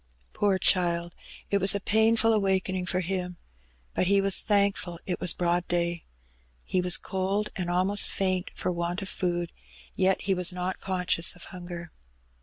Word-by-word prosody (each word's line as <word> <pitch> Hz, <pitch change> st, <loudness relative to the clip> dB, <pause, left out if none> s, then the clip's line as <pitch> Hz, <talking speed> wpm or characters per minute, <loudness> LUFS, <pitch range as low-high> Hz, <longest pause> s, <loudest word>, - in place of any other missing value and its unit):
^ -, -, -38 dB
Poor 200 Hz, -2 st, +1 dB
child! 175 Hz, -2 st, +1 dB, 0.4 s
it 200 Hz, -, +3 dB
was 195 Hz, +1 st, +4 dB
a -, -, 0 dB
painful 225 Hz, +2 st, +3 dB
awaking 190 Hz, -3 st, 0 dB
for 185 Hz, 0 st, +1 dB
him. 180 Hz, 0 st, -3 dB, 0.6 s
But 180 Hz, -, 0 dB
he 200 Hz, +1 st, +4 dB
was 195 Hz, -2 st, +4 dB
thankful 200 Hz, -4 st, 0 dB
it 180 Hz, -, -3 dB
was 175 Hz, -, +1 dB
broad 175 Hz, 0 st, 0 dB
day. 170 Hz, -1 st, -1 dB, 0.6 s
He 185 Hz, -, 0 dB
was 180 Hz, 0 st, +3 dB
cold, 195 Hz, +2 st, -2 dB
and 180 Hz, -2 st, -3 dB
almost 185 Hz, +3 st, +2 dB
faint 185 Hz, -2 st, -1 dB
for -, -, -2 dB
want 175 Hz, +2 st, -3 dB
of 190 Hz, -, -4 dB
food, 175 Hz, -1 st, -2 dB, 0.4 s
yet 190 Hz, 0 st, +1 dB
he 195 Hz, -, +1 dB
was 180 Hz, -1 st, +2 dB
not 180 Hz, +1 st, -3 dB
conscious 180 Hz, -3 st, +2 dB
of 175 Hz, -, -11 dB
hunger. 175 Hz, -2 st, -8 dB
185 Hz, 170 wpm, -27 LUFS, 175-195 Hz, 0.6 s, was